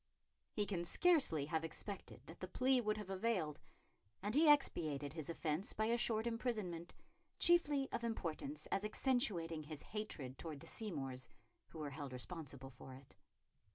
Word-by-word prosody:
He 210 Hz, -, 0 dB
can 185 Hz, -3 st, -1 dB
scarcely 215 Hz, -, +4 dB
have 160 Hz, +2 st, 0 dB
expected 195 Hz, +5 st, -4 dB
that 165 Hz, -, -11 dB
the 185 Hz, -, -4 dB
plea 255 Hz, +6 st, +3 dB
would 215 Hz, -1 st, 0 dB
have 205 Hz, -2 st, -5 dB
availed, 185 Hz, -6 st, 0 dB, 0.6 s
and 205 Hz, +2 st, -1 dB
he 300 Hz, +2 st, +8 dB
expiated 155 Hz, -, +2 dB
his 160 Hz, -2 st, -4 dB
offence 165 Hz, +2 st, -1 dB
by 215 Hz, -, +1 dB
a 230 Hz, +2 st, +3 dB
short 225 Hz, -2 st, +2 dB
imprisonment, 215 Hz, -8 st, -2 dB, 0.4 s
chiefly 295 Hz, -6 st, +5 dB
of 235 Hz, -, -2 dB
importance 230 Hz, -, -3 dB
as 195 Hz, -, +1 dB
accentuating 210 Hz, -, +1 dB
his 150 Hz, -1 st, -7 dB
hatred 150 Hz, -12 st, -4 dB
towards 155 Hz, -4 st, -5 dB
the -, -, -10 dB
Seymours, 135 Hz, -, -3 dB, 0.4 s
who -, -, -12 dB
were 150 Hz, -2 st, -3 dB
held 140 Hz, -1 st, -5 dB
responsible 135 Hz, -1 st, -5 dB
for 130 Hz, +1 st, -10 dB
it. 130 Hz, -6 st, -15 dB
180 Hz, 155 wpm, -40 LUFS, 150-230 Hz, 0.6 s, he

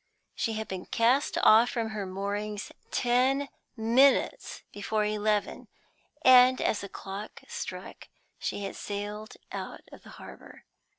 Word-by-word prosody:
She 225 Hz, -, -2 dB
had 220 Hz, 0 st, -4 dB
been 190 Hz, -1 st, -6 dB
cast 245 Hz, +5 st, +2 dB
off 225 Hz, +3 st, +7 dB
from 230 Hz, -2 st, -2 dB
her 210 Hz, -3 st, -4 dB
moorings 205 Hz, +2 st, -4 dB, 0.2 s
ten 260 Hz, +3 st, +1 dB, 0.3 s
minutes 240 Hz, +5 st, +2 dB
before 210 Hz, +1 st, -1 dB
eleven, 210 Hz, 0 st, -1 dB, 0.6 s
and 255 Hz, 0 st, +7 dB
as 215 Hz, -, 0 dB
the 200 Hz, -, -7 dB
clock 195 Hz, +3 st, -8 dB
struck 475 Hz, 0 st, -7 dB, 0.3 s
she 205 Hz, -, -3 dB
had 195 Hz, -, -5 dB
sailed 205 Hz, +1 st, -6 dB, 0.2 s
out -, -, -6 dB
of -, -, -13 dB
the -, -, -15 dB
harbor. -, -, -13 dB
215 Hz, 130 wpm, -28 LUFS, 205-245 Hz, 0.6 s, off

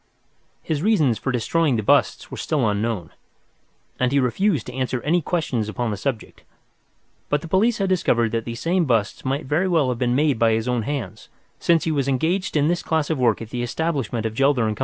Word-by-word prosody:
His 155 Hz, -3 st, -2 dB
reasons 155 Hz, -, +2 dB
for 135 Hz, -, -2 dB
destroying 140 Hz, +4 st, +1 dB
the 110 Hz, -, -1 dB
busts -, -, +2 dB
were -, -, -6 dB
still 140 Hz, -7 st, 0 dB
unknown, 105 Hz, -4 st, -2 dB, 0.9 s
and 125 Hz, 0 st, +1 dB
he 140 Hz, -, +3 dB
refused 145 Hz, -, +1 dB
to 125 Hz, -, -8 dB
answer 130 Hz, -1 st, -2 dB
any 170 Hz, +4 st, +2 dB
questions 135 Hz, -11 st, -1 dB
upon 115 Hz, +1 st, -2 dB
the -, -, -2 dB
subject, 120 Hz, +1 st, -4 dB, 0.9 s
but 145 Hz, 0 st, +1 dB
the 165 Hz, -, -8 dB
police 215 Hz, +7 st, +2 dB
had 195 Hz, -2 st, -1 dB
discovered 120 Hz, -11 st, +2 dB
that 115 Hz, -1 st, -1 dB
these 115 Hz, 0 st, -6 dB
same 175 Hz, +1 st, +1 dB
busts 115 Hz, -6 st, 0 dB
might 135 Hz, +3 st, -2 dB
very 155 Hz, +8 st, +1 dB
well 160 Hz, -7 st, +2 dB
have 120 Hz, -2 st, -2 dB
been 125 Hz, -1 st, +1 dB
made 145 Hz, -4 st, +2 dB
by 115 Hz, -1 st, +4 dB
his 110 Hz, +2 st, -1 dB
own 125 Hz, -2 st, 0 dB
hands, 120 Hz, -7 st, -5 dB, 0.3 s
since 170 Hz, -1 st, +3 dB
he 160 Hz, -, 0 dB
was 140 Hz, -3 st, 0 dB
engaged 160 Hz, +7 st, 0 dB
in 145 Hz, 0 st, +3 dB
this 175 Hz, +1 st, 0 dB
class 160 Hz, -1 st, -1 dB
of 155 Hz, -, -1 dB
work 115 Hz, -3 st, +2 dB
at 110 Hz, -, -12 dB
the 120 Hz, -, -3 dB
establishment 125 Hz, -4 st, -2 dB
of 110 Hz, -, -2 dB
Gelder 135 Hz, -2 st, +2 dB
& -, -, -10 dB
Co. -, -, -15 dB
135 Hz, 220 wpm, -22 LUFS, 115-160 Hz, 0.9 s, by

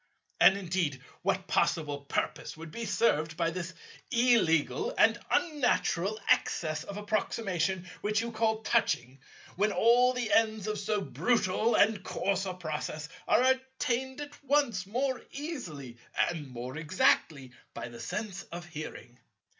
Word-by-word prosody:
"And 195 Hz, -, +7 dB
indeed 175 Hz, -7 st, -1 dB, 0.2 s
what 190 Hz, -1 st, 0 dB
possible 150 Hz, -6 st, +1 dB
purpose 140 Hz, -, -3 dB
would 160 Hz, 0 st, -9 dB
be 235 Hz, +7 st, -5 dB
served 160 Hz, -9 st, +1 dB
by 165 Hz, -1 st, +1 dB
this 175 Hz, 0 st, -5 dB, 0.3 s
illegal 235 Hz, -, +2 dB
and -, -, +5 dB
unnatural 245 Hz, -, +1 dB
excess 155 Hz, -2 st, +1 dB
of 200 Hz, +3 st, -7 dB
approximation 195 Hz, -4 st, -1 dB
which 210 Hz, 0 st, +1 dB
you 235 Hz, +1 st, -2 dB
call 220 Hz, -1 st, 0 dB
touching, 135 Hz, -, +1 dB, 0.4 s
when 210 Hz, +2 st, +2 dB
all 245 Hz, +4 st, +5 dB
the 245 Hz, -3 st, -1 dB
ends 220 Hz, -2 st, +3 dB
of 215 Hz, -1 st, -2 dB
so 205 Hz, 0 st, -1 dB
brutal 225 Hz, 0 st, +1 dB
and 210 Hz, -2 st, +3 dB
course 195 Hz, 0 st, -1 dB
a 185 Hz, -, -4 dB
process 155 Hz, -3 st, -4 dB, 0.2 s
are -, -, +4 dB
attained 260 Hz, 0 st, 0 dB
at 290 Hz, 0 st, -9 dB
once 265 Hz, -10 st, +1 dB
more 260 Hz, +4 st, -1 dB
easily 170 Hz, -, -6 dB, 0.3 s
and 155 Hz, -4 st, -6 dB
more 125 Hz, +2 st, -7 dB
exactly 155 Hz, -4 st, +1 dB, 0.2 s
by -, -, -5 dB
the 120 Hz, -1 st, -11 dB
sense 195 Hz, -, -4 dB
of 175 Hz, +1 st, -6 dB
hearing? 145 Hz, -5 st, -8 dB
195 Hz, 140 wpm, -30 LUFS, 160-235 Hz, 0.4 s, And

